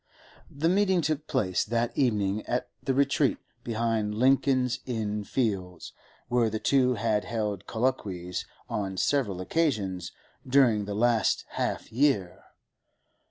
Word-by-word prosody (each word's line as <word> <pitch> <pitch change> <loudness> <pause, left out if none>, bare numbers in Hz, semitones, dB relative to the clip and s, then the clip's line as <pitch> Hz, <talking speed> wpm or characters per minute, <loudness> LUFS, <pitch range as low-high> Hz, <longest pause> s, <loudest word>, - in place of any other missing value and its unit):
The 145 +4 -1
meeting 190 0 +3
took 155 -1 -2
place 95 -9 +1
that 115 +1 -1
evening 105 -5 +1
at 125 - -1
the 135 - -1
retreat 140 0 +2 0.3
behind 115 -2 -1
Lincoln's 130 +1 +2
Inn 105 -4 -2
Fields 95 -8 -2 0.3
where 120 -2 +2
the 110 - -2
two 125 +1 +2
had 110 -1 0
held 105 -5 -3
colloquies 100 -8 -2 0.2
on 95 -2 -3
several 110 -7 +1
occasions 100 - -1 0.4
during 125 -6 +4
the 100 0 -4
last 115 +1 +2
half - - -3
year. 115 -8 +1
115 Hz, 120 wpm, -28 LUFS, 105-130 Hz, 0.4 s, during